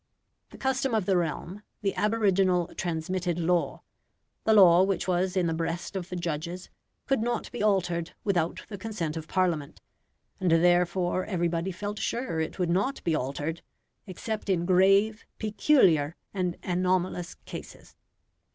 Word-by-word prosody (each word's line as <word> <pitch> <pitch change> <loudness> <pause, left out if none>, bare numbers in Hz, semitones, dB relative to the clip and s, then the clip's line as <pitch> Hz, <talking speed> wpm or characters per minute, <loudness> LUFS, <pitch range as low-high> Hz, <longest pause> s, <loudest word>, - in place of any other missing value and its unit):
The - - -13
custom 265 -2 0
of 215 -4 +1
the 195 - +2
realm 175 +3 -2 0.2
the 195 - +1
aboriginal 195 -5 +2
transmitted 175 +1 -2
law 175 0 0 0.6
the 220 - +5
law 180 -3 +8
which 190 -1 0
was 185 +1 0
in 180 - +2
the 165 - 0
breast 165 +3 -3
of 185 -1 -4
the 180 - -4
judges, 170 +1 -4 0.3
could 270 -4 +1
not 240 +1 -2
be 240 - -5
altered 175 -5 0
without 175 -5 0
the 200 -3 -8
consent 185 -7 -3
of 160 -1 -6
Parliament, 170 -6 -1 0.6
and 185 -2 +1
therefore 175 +2 +3
everybody 175 -1 -1
felt 205 +3 -5
sure 235 -9 -2
it 160 - -3
would 180 -3 0
not 200 +10 0
be 165 - +1
altered 150 +3 -2 0.5
except 210 +3 -5
in 175 -3 +1
grave, 195 +4 +4
peculiar, 190 - +3 0.2
and 180 -3 -1
anomalous 180 -1 0
cases. - - -10
180 Hz, 145 wpm, -28 LUFS, 170-200 Hz, 0.6 s, law